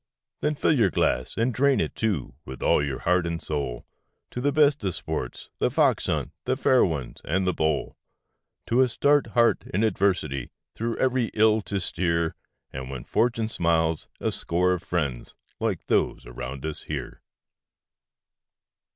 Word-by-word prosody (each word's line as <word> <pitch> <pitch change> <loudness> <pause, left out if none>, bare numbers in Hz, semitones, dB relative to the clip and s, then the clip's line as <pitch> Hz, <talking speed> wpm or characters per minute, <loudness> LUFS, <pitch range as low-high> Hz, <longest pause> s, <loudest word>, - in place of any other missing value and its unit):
Then 150 0 +1
fill 145 - +2
your 115 -10 +4
glass, 65 -6 0
and 120 +2 +1
drain 140 +1 +3
it, - - -1
too, 100 - -1
with 65 -3 -8
all - - +4
your 70 -2 -2
heart 90 0 +2
and 85 -1 -2
soul, 70 -7 -3 0.5
To 125 - -4
the 145 +2 +2
best 145 -3 +3
of 95 -4 -1
sports - - -5
The - - +2
Fox - - +2
hunt, - - -1
The 130 +1 0
Fair 130 -2 +4
Ones, 70 -8 -3
and 95 +4 0
The 90 - +2
Bowl, 80 -2 0 0.7
To 120 +3 +3
a 130 - +4
stout 145 +5 +3
heart 115 0 +4
in 100 +5 +1
adversity 90 - 0 0.2
through 115 +1 -3
every 130 -3 +1
ill 110 0 +4
to 100 - 0
steer, 85 -2 0 0.4
And 65 -1 -6
when 65 -3 -6
Fortune 115 -1 +1
smiles 80 -5 +1
a - - 0
score 90 +2 +1
of 90 - -3
friends 75 -9 -3 0.2
like - - -1
those - - +1
around 60 +3 -6
us 80 -1 -4
here. - - -6
90 Hz, 165 wpm, -26 LUFS, 75-115 Hz, 0.7 s, your